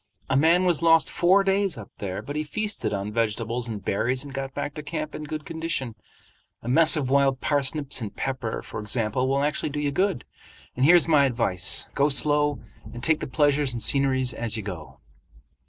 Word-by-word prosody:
A - - +3
man 165 +6 +4
was 175 -3 +2
lost 165 -1 +4
four 190 +3 +4
days 195 -3 0
up 110 - -10
there, 95 -2 -4
but 145 +2 -7
he 155 - -1
feasted 200 - -3
on 100 +1 -4
vegetables 115 +2 -1
and 105 -4 -6
berries 125 +6 0
and 140 -2 -10
got 135 0 -4
back 145 - -4
to 150 - -6
camp 150 +1 -5
in 150 - -6
good 150 0 -6
condition. 160 -7 -4 0.7
A - - -8
mess 160 +6 +4
of 135 -3 -2
wild 135 -1 +3
parsnips 140 -1 0
and 105 -3 -6
pepper, 130 -4 -3
for - - -7
example, 110 +3 -1
will 135 +1 +1
actually 150 +1 -1
do 145 +1 -4
you 145 -1 -1
good. 190 -1 0 0.5
And 130 - +2
here's 175 +2 +6
my 150 -4 +5
advice—go 115 +3 0
slow 145 +1 +1 0.3
and 120 - -9
take 160 -1 +2
the - - -5
pleasures 145 -1 +1
and 115 - -2
sceneries 130 -2 +3
as 115 -1 -2
you 110 - -5
go." 90 -7 -8
140 Hz, 195 wpm, -25 LUFS, 120-155 Hz, 0.7 s, here's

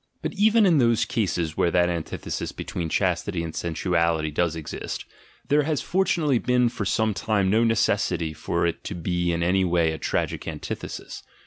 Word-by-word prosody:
But - - -2
even 215 +1 +4
in 170 -6 +4
those 115 -3 +3
cases 85 -7 -1
where 85 - +2
that 90 +1 +3
antithesis 85 -2 -4
between 85 -2 -4
chastity 90 0 0
and 80 -1 -5
sensuality 85 -2 0
does 85 +2 0
exist, 80 -2 -5 0.4
there 150 +1 +4
has 150 -1 0
fortunately 170 -8 +1
been 125 0 +2
for 105 - -4
some 110 +2 +1
time 100 -2 +1
no 110 +2 +4
necessity 85 -7 +1
for 75 - -1
it 85 -1 -2
to 100 - -4
be 90 0 -1
in 85 0 -1
any 95 +2 +2
way 85 -3 +2
a 80 - -5
tragic - - -2
anti - - -4
thesis. - - -7
90 Hz, 180 wpm, -25 LUFS, 85-115 Hz, 0.4 s, even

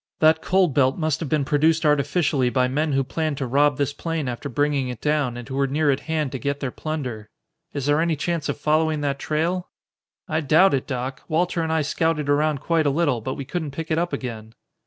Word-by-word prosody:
That 160 0 +4
cold 185 -5 +2
belt 130 -1 +3
must 155 -3 0
have 160 - -4
been 150 -3 +1
produced 160 +3 +2
artificially 145 -2 +2
by 125 +1 +2
men 150 +3 0
who 135 0 +2
planned 155 +2 -2
to 135 - -2
rob 140 +2 +2
this 145 0 0
plane 165 -2 -3
after 120 -1 -4
bringing 145 +1 0
it 125 -3 -6
down 145 -4 0
and 120 0 -8
who 135 - -7
were 140 +1 +1
near 145 +2 +2
at 135 - 0
hand 155 -3 -2
to 135 - -4
get 140 +1 -2
their 135 -3 -3
plunder. 125 -10 -5 0.4
Is 140 -2 -4
there 145 +2 +3
any 165 -1 +1
chance 165 +1 -2
of - - -2
following 155 0 +1
that 140 -1 -1
trail?" 170 +5 -1 0.6
"I 155 +1 0
doubt 160 +5 +5
it, 135 - -1
Doc. 130 0 -4
Walter 170 +1 0
and 160 -1 -1
I 160 -1 +1
scouted 150 -1 0
around 145 -1 +2
quite 160 -1 +1
a - - +4
little, 145 -5 +1
but 130 +4 -4
we 140 - -6
couldn't 160 0 -3
pick 165 0 -4
it 160 - +2
up 175 +1 -1
again." 115 -5 -6
145 Hz, 230 wpm, -23 LUFS, 135-160 Hz, 0.6 s, doubt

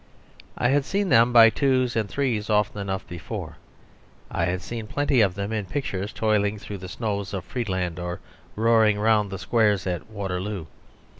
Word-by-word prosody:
I 125 - +2
had 140 +1 +3
seen 200 +5 -1
them 115 -1 +5
by 115 -2 +8
twos 130 -3 +1
and 110 -3 0
threes 120 -7 -1
often 105 -1 +1
enough 95 0 -4
before. 85 -2 -7 0.7
I - - 0
had 90 0 -2
seen 115 -2 -6
plenty 145 0 +2
of 95 -4 +2
them 100 +2 -3
in 105 -2 -2
pictures 100 -4 -3
toiling 105 -1 +1
through 100 -1 -7
the 90 0 -8
snows 100 -2 -3
of 90 -3 -5
Friedland 95 -8 -3
or 90 0 -4 0.4
roaring 110 -1 +4
round 105 -1 +3
the 95 - -5
squares 105 0 +1
at 90 -1 -3
Waterloo. 100 -3 -4
105 Hz, 170 wpm, -25 LUFS, 95-115 Hz, 0.7 s, by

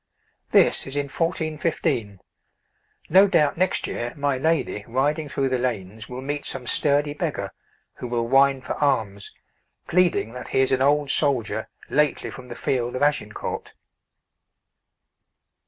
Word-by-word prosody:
This - - +4
is 135 - -4
in 140 -1 -1
1415. 155 - -1 0.9
No 190 +4 +6
doubt 150 -7 +3
next 185 +2 +1
year 120 0 -4
my 145 -1 0
lady, 145 -6 0
riding 145 +5 0
through 135 -1 0
the 130 -1 0
lanes, 110 -4 -4
will 125 +1 -6
meet 145 +1 -3
some 125 - -2
sturdy 145 +4 +2
beggar, 145 - -3 0.5
who 125 - -6
will 120 -1 -1
whine 135 +1 +4
for - - -3
alms, 110 -8 0 0.5
pleading 175 -10 +2
that 125 - -8
he 130 - +1
is 130 - +2
an 130 -1 +2
old 145 0 +3
soldier 115 -7 0 0.2
lately 150 0 +1
from 125 -1 -10
the - - -8
field 125 -2 -1
of 130 - -1
Agincourt. 145 -8 -2
135 Hz, 140 wpm, -24 LUFS, 120-150 Hz, 0.9 s, No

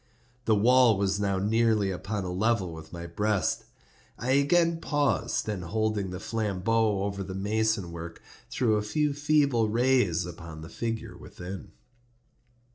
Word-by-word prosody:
The 110 - +4
wall 120 +1 +5
was 100 0 0
now 100 -1 0
nearly 110 0 +2
upon 100 +3 -3
a 90 - -4
level 95 -2 0
with 80 -1 -10
my 85 -1 -7
breast. 105 +4 0 0.5
I 125 +2 -2
again 165 +5 +3
paused, 145 -6 0
and 100 -4 -3
holding 110 +1 -1
the 90 0 -6
flambeaux 105 0 0
over 100 0 -3
the 95 0 -6
mason 105 -2 0
work, 85 0 -8 0.3
threw 110 -4 +1
a - - 0
few 150 +7 0
feeble 140 -6 +2
rays 120 -7 +2
upon 85 -2 -9
the 80 - -9
figure 115 0 -4
within. 90 +2 -9
105 Hz, 145 wpm, -28 LUFS, 95-115 Hz, 0.5 s, wall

